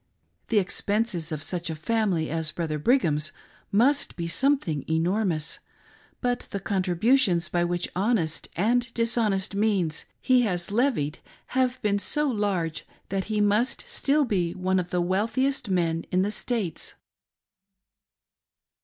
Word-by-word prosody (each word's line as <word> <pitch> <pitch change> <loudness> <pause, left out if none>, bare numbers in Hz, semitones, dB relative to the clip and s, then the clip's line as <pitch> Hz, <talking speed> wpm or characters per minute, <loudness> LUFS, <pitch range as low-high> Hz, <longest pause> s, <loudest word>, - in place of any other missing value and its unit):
The 225 - +1
expenses 200 -3 0
of 155 -1 -3
such 175 0 -3
a 160 - -3
family 180 -2 0
as 160 -1 -1
'Brother 155 -3 -3
Brigham's 155 - +2 0.4
must 260 +8 +2
be 170 -1 -3
something 180 - +2
enormous, 165 -1 0 0.6
but 245 -1 -1
the 200 - -3
contributions 185 -1 +2
which 175 0 0
by 185 - -1
honest 195 -8 0
and 235 +6 +1
dishonest 225 -5 +1
means 195 -6 0
he 255 -1 +4
has 180 -6 -1
levied 210 - +1 0.3
have 255 0 +1
been 205 -1 +2
so 300 +8 0
large 200 - -1 0.2
that 195 0 -1
he 215 -1 0
must 210 +5 +1
still 290 +1 +1
be 180 -7 0
one 185 0 +1
of 180 -1 -3
the 180 0 0
wealthiest 220 +8 0
men 165 -3 0
in 185 +1 +2
the 205 - -1
States. 215 -7 -3
195 Hz, 135 wpm, -26 LUFS, 170-230 Hz, 0.6 s, he